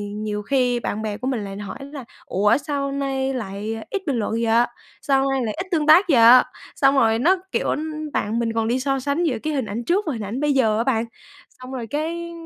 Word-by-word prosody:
nhiều 210 -1 -3
khi 245 +1 +1
bạn 215 -2 -3
bè 210 -1 -3
của 255 - -5
mình 240 -6 -1
lại 195 0 -7
hỏi 205 +4 -7
là 280 -2 -8 0.2
"Ủa, 205 +5 +2
sao 280 -1 -3
nay 270 -1 -2
lại 215 -1 -4
ít 400 - -2
bình 275 - +1
luận 210 - -2
vậy, 230 +1 +2 0.4
sao 275 -1 +2
nay 265 -1 0
lại 215 - -2
ít 370 - -5
tương 310 -3 +1
tác 345 +6 +7
vậy?" 240 -1 +7 0.3
Xong 275 0 +3
rồi 225 -3 +3
nó, 355 +9 +4 0.2
kiểu - - -1 0.5
bạn 220 +3 -1
mình 230 -1 -1
còn 225 -1 0
đi 250 +2 +1
so 270 0 0
sánh 285 +6 -1
giữa 265 -8 0
cái 310 0 -1
hình 265 -5 -1
ảnh 225 +4 -4
trước 375 - +1
và 295 - 0
hình 225 - -5
ảnh 220 +7 -4
bây 295 -1 +1
giờ 220 -5 +2
á 230 - +1
bạn, 235 -3 0 0.4
xong 255 +1 -12
rồi 240 -4 -5
cái 335 +5 -3
255 Hz, 235 wpm, -22 LUFS, 225-280 Hz, 0.5 s, tác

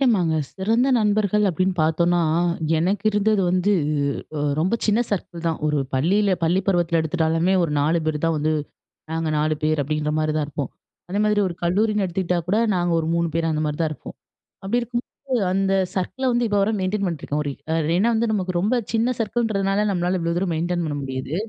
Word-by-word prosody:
நாங்க 170 -4 +1 0.2
சிறந்த 225 +7 +1
நண்பர்கள் 210 -1 +2
அப்படின்னு 185 +2 0
பார்த்தோம்னா, 170 +2 +2 0.6
"எனக்கு 185 +5 0
இருந்தது 210 0 +2
வந்து 185 +3 +2 0.9
ரொம்ப 185 +8 +1
சின்ன 215 +1 +3
சர்க்கிள் 175 -4 -4
தான்," 165 - -1
ஒரு 150 0 +1 0.2
பள்ளியில 195 +10 +2
பள்ளி 170 +3 +3
பருவத்தில 175 -3 +2
எடுத்துட்டாலுமே 165 +2 +1
ஒரு 165 - -1
4 155 +4 +2
பேர் 155 -1 0
தான் 165 -1 +1
வந்து, 155 +1 0 0.6
நாங்க 160 0 -1
4 155 +1 +1
பேர் 155 -1 +2
அப்படிங்கிற 150 +1 -1
மாதிரிதான் 155 -1 0
இருப்போம். 145 -2 -4 0.4
அதே 200 +3 -1
மாதிரி 210 -1 +2
ஒரு 175 - -5
கல்லூரின்னு 210 +4 +1
எடுத்துக்கிட்டா 180 -1 -1
கூட 200 +4 +2 0.2
நாங்க 175 -1 0
ஒரு 160 - -2
3 170 0 +1
பேர் 165 -1 +1
அந்த 155 0 -1
மாரி 150 -1 -2
தான் 160 -1 0
இருப்போம். 155 - -9 0.5
அப்படி 215 +6 0
இருக்கும்போது 240 +1 -5 0.4
அந்த 195 0 +1 0.2
சர்க்கிள 195 +8 -3
வந்து 240 0 +1
இப்போ 205 -1 +1
வரை 220 +3 +1
மெயின்டெயின் 195 +1 -1
பண்ணிட்டுருக்கோம். 150 -3 -2
ஒரு 145 - -2 0.4
ஏனா, 205 +6 +3
வந்து 225 0 +1
நமக்கு 185 -4 -1
ரொம்ப 210 +7 +1 0.2
சின்ன 235 +3 +2
சர்க்கிள் 235 +1 0
ன்றதுனால 195 0 0
நம்மளால 180 0 0
இவ்வளோ 170 0 -1
தூரம் 180 -3 -1
மெயின்டெயின் 175 +1 -1
பண்ண 145 - -3
முடியாது. 130 +3 -4
180 Hz, 180 wpm, -22 LUFS, 160-205 Hz, 0.9 s, சின்ன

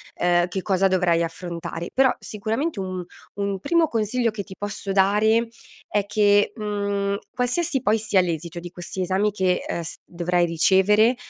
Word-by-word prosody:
ehm, 175 0 +2
che 185 +1 -4
cosa 195 0 +2
dovrai 180 -3 +2
affrontare. 170 0 -5
Però 265 -1 +4
sicuramente 225 +6 -3
un 185 -1 -4 0.3
un 200 -1 -2
primo 325 - +2
consiglio 230 0 0
che 210 -1 -5
ti 190 -1 -11
posso 205 -1 -4
dare 210 +4 +3 0.4
è 205 -1 0
che, 205 -1 +3
mhmm, 200 -2 -1 0.2
qualsiasi 260 +3 0
poi 215 +1 +2
sia 215 -3 +2
l'esito 170 -1 -3
di 175 +1 -8
questi 175 +1 -6
esami 190 +3 +1
che, 185 -3 0
ehm, 170 - -2
s 165 - -6
dovrai 175 0 0
ricevere, 190 +7 +4
200 Hz, 160 wpm, -23 LUFS, 180-215 Hz, 0.4 s, Però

